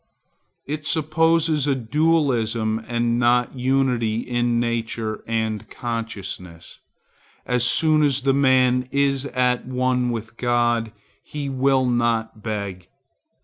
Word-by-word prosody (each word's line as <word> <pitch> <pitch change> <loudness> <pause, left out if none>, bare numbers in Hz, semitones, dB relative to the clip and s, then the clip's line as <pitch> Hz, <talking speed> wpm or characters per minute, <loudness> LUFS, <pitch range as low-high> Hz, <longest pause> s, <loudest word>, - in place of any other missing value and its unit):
It 150 +1 -4
supposes 160 -1 +1
dualism 120 -5 +1
and 120 0 0
not 120 0 +2
unity 125 -4 +1
in 120 -1 0
nature 115 -2 -2
and 110 -2 -2
consciousness. 100 -7 -6 0.7
As 125 -1 +1
soon 155 +5 +3
as 140 -3 +1
the 135 0 +3
man 130 -2 +3
is 140 -1 +1
at 125 -2 0
one 125 -1 0
with 115 -1 -5
God, 120 -2 +1 0.3
he 145 -2 -6
will 135 0 +2
not 120 -3 0
beg. 100 -5 -5
120 Hz, 105 wpm, -22 LUFS, 115-135 Hz, 0.7 s, soon